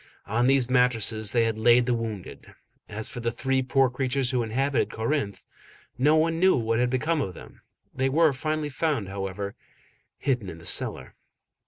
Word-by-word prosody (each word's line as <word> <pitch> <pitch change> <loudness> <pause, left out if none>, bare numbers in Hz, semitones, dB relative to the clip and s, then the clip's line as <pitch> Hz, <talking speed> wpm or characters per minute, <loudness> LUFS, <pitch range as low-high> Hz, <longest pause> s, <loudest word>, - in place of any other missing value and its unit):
On 120 +4 +1
these 135 -2 +3
mattresses 115 -4 +2
they 115 -1 +3
had 110 -1 -1
laid 120 +2 +5
the 125 - +1
wounded. 110 -5 -6 0.3
As 110 +1 -3
for - - -5
the 115 0 -1
three 135 +2 0
poor 130 +1 +3
creatures 130 0 -1
who 125 -2 +1
inhabited 130 +4 0
Corinthe, 115 -2 -2 0.5
no 150 +5 +3
one 165 +1 +2
knew 185 +1 +5
what 115 -1 0
had 125 0 +2
become 150 +5 0
of 95 -9 -4
them. - - -13 0.3
They 130 +1 0
were 155 +1 +3
finally 155 +2 -2
found, 140 - -1
however, 100 0 -4 0.6
hidden 125 -8 -1
in 80 - -8
the 85 - -14
cellar. 65 - -2
125 Hz, 175 wpm, -26 LUFS, 110-135 Hz, 0.6 s, laid